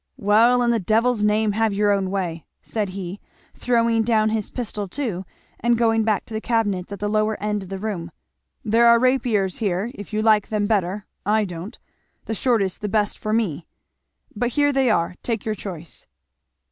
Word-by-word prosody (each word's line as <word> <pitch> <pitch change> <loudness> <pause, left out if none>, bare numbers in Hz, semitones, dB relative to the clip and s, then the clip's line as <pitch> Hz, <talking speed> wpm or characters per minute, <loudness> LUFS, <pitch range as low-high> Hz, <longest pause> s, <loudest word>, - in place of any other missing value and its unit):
"Well, 230 +5 +4
in 240 - +3
the 230 - +1
devil's 225 +3 +1
name, 210 0 +2
have 220 0 +1
your 205 0 +3
own 195 -2 +1
way," 180 -4 -3 0.2
said 210 -3 -2
he, 185 0 -6 0.3
throwing 230 -2 +2
down 220 -1 +2
his 215 -2 -2
pistol 215 -4 -4
too, 190 -4 -3 0.3
and 235 +1 +2
going 225 -1 +2
back 215 -1 0
to - - -10
the 220 - -2
cabinets 205 -6 -1
at 200 - -5
the 205 - -2
lower 215 +1 +1
end 210 0 -1
of 190 - -10
the 195 - -4
room, 190 -5 -4 0.6
"there 230 +2 +4
are 235 0 +7
rapiers 235 -6 +1
here, 200 +1 -1
if 205 - -10
you 215 0 -1
like 215 -2 +4
them 210 -1 0
better 205 -1 0 0.2
I 215 +1 +2
don't, 180 +3 -7 0.5
the 225 - -3
shortest 220 -6 0
the 210 - -2
best 210 0 0
for 215 - -3
me, 200 -8 -1 0.7
but 240 +3 0
here 290 +1 +3
they 270 -2 +2
are 170 -5 +1
take 230 -4 -3
your 215 - 0
choice." 175 -5 -8
215 Hz, 190 wpm, -22 LUFS, 195-230 Hz, 0.7 s, are